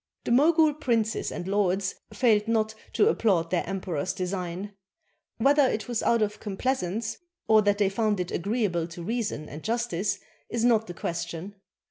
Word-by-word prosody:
The -, -, -2 dB
Mogul 310 Hz, +4 st, +5 dB
princes 230 Hz, -7 st, 0 dB
and 175 Hz, -, -5 dB
lords 195 Hz, -1 st, +1 dB, 0.2 s
failed 220 Hz, -4 st, +3 dB
not 220 Hz, -1 st, +1 dB, 0.2 s
to 415 Hz, -, +4 dB
applaud 190 Hz, -, +2 dB
their 180 Hz, -, +1 dB
emperor's 185 Hz, -3 st, -2 dB
design. 185 Hz, +1 st, -4 dB, 0.6 s
Whether 290 Hz, +2 st, +4 dB
it 220 Hz, -, -2 dB
was 240 Hz, -2 st, -1 dB
out 235 Hz, -2 st, +3 dB
of 210 Hz, 0 st, -3 dB
complai 215 Hz, +5 st, -1 dB
sance 220 Hz, 0 st, -3 dB, 0.3 s
or 220 Hz, -1 st, +6 dB
that 205 Hz, -1 st, +2 dB
they 205 Hz, -1 st, +3 dB
found 210 Hz, 0 st, 0 dB
it 180 Hz, -, -3 dB
agreeable 195 Hz, -4 st, 0 dB
to 170 Hz, 0 st, -9 dB
reason 215 Hz, -7 st, -2 dB
and 150 Hz, +2 st, -9 dB
justice 215 Hz, -4 st, -1 dB, 0.3 s
is 235 Hz, 0 st, 0 dB
not 225 Hz, -2 st, +3 dB
the 175 Hz, -, -7 dB
question. 170 Hz, +3 st, -4 dB
210 Hz, 165 wpm, -27 LUFS, 180-230 Hz, 0.6 s, or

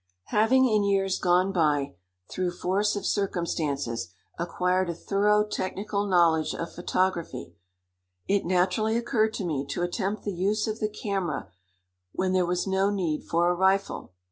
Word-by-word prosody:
Having 255 Hz, +5 st, +4 dB
in 215 Hz, -3 st, +2 dB
years 195 Hz, -1 st, +1 dB
gone 180 Hz, +2 st, +3 dB
by, 150 Hz, -, +1 dB, 0.3 s
through 180 Hz, -1 st, -2 dB
force 200 Hz, +4 st, +1 dB
of 205 Hz, -, -4 dB
circumstances, 145 Hz, -, -1 dB, 0.2 s
acquired 180 Hz, +2 st, 0 dB
a 170 Hz, -, -3 dB
thorough 210 Hz, +3 st, +2 dB
technical 200 Hz, +1 st, -3 dB
knowledge 170 Hz, -4 st, +3 dB
of 170 Hz, -, -5 dB
photography, 175 Hz, -, -2 dB, 0.7 s
it 200 Hz, 0 st, +2 dB
naturally 185 Hz, +5 st, +1 dB
occurred 220 Hz, -2 st, +1 dB
to 195 Hz, -, -3 dB
me 150 Hz, -5 st, -1 dB
to 175 Hz, +5 st, -2 dB
attempt 195 Hz, +4 st, -2 dB
the 205 Hz, -, -3 dB
use 200 Hz, +4 st, 0 dB
of 220 Hz, 0 st, -3 dB
the 215 Hz, -, 0 dB
camera 190 Hz, -, -3 dB, 0.6 s
when 185 Hz, 0 st, 0 dB
there 185 Hz, -2 st, +2 dB
was 180 Hz, 0 st, 0 dB
no 195 Hz, 0 st, +1 dB
need 175 Hz, -7 st, -2 dB
for 170 Hz, +1 st, +2 dB
a -, -, +2 dB
rifle. 190 Hz, -, +1 dB
185 Hz, 150 wpm, -27 LUFS, 175-205 Hz, 0.7 s, Having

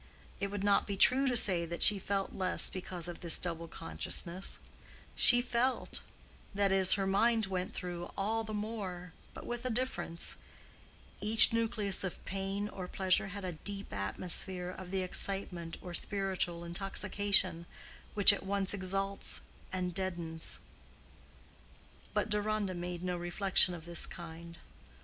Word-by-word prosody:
It 200 Hz, -, -1 dB
would 200 Hz, 0 st, -4 dB
not 200 Hz, -1 st, +3 dB
be 200 Hz, -1 st, -3 dB
true 265 Hz, +7 st, +5 dB
to 250 Hz, -2 st, +3 dB
say 185 Hz, -6 st, +4 dB
that 170 Hz, 0 st, -1 dB
she 205 Hz, -1 st, +6 dB
felt 195 Hz, 0 st, -2 dB
less 185 Hz, -1 st, +2 dB
because 180 Hz, -2 st, -4 dB
of 175 Hz, -, -7 dB
this 170 Hz, -3 st, +3 dB
double 170 Hz, -1 st, -3 dB
consciousness: 170 Hz, +2 st, -1 dB, 0.6 s
she 245 Hz, 0 st, +6 dB
felt—that 235 Hz, -5 st, -2 dB
is, 190 Hz, -1 st, +5 dB
her 195 Hz, -1 st, +1 dB
mind 220 Hz, +3 st, +2 dB
went 185 Hz, -1 st, -4 dB
through—all 195 Hz, +5 st, -3 dB
the 220 Hz, -, -7 dB
more, 195 Hz, -5 st, -5 dB, 0.2 s
but -, -, -9 dB
with 240 Hz, 0 st, -4 dB
a 255 Hz, -, -2 dB
difference; 240 Hz, -8 st, -3 dB, 0.8 s
each 220 Hz, +1 st, +5 dB
nucleus 220 Hz, -4 st, +1 dB
of 190 Hz, -, -6 dB
pain 195 Hz, +2 st, -3 dB
or 185 Hz, -3 st, -7 dB
pleasure 190 Hz, +1 st, +1 dB
had 200 Hz, 0 st, -7 dB
a 180 Hz, -, -3 dB
deep 200 Hz, -, -6 dB
atmosphere 180 Hz, -, 0 dB
of 185 Hz, -1 st, -9 dB
the 190 Hz, 0 st, -1 dB
excitement 180 Hz, -3 st, -2 dB
or 180 Hz, -, -7 dB
spiritual 185 Hz, -2 st, -1 dB
intoxication 195 Hz, 0 st, +1 dB, 0.5 s
which 205 Hz, 0 st, +10 dB
at -, -, -4 dB
once 195 Hz, 0 st, -1 dB
exalts 195 Hz, +1 st, -3 dB, 0.3 s
and 180 Hz, -1 st, -2 dB
deadens. 170 Hz, -3 st, -4 dB, 1.6 s
But -, -, +1 dB
Deronda 210 Hz, -2 st, -1 dB
made 175 Hz, 0 st, -5 dB
no 180 Hz, -1 st, -2 dB
reflection 180 Hz, +1 st, +3 dB
of 165 Hz, -2 st, -11 dB
this 170 Hz, -1 st, +2 dB
kind. 170 Hz, 0 st, -10 dB
190 Hz, 140 wpm, -32 LUFS, 175-205 Hz, 1.6 s, which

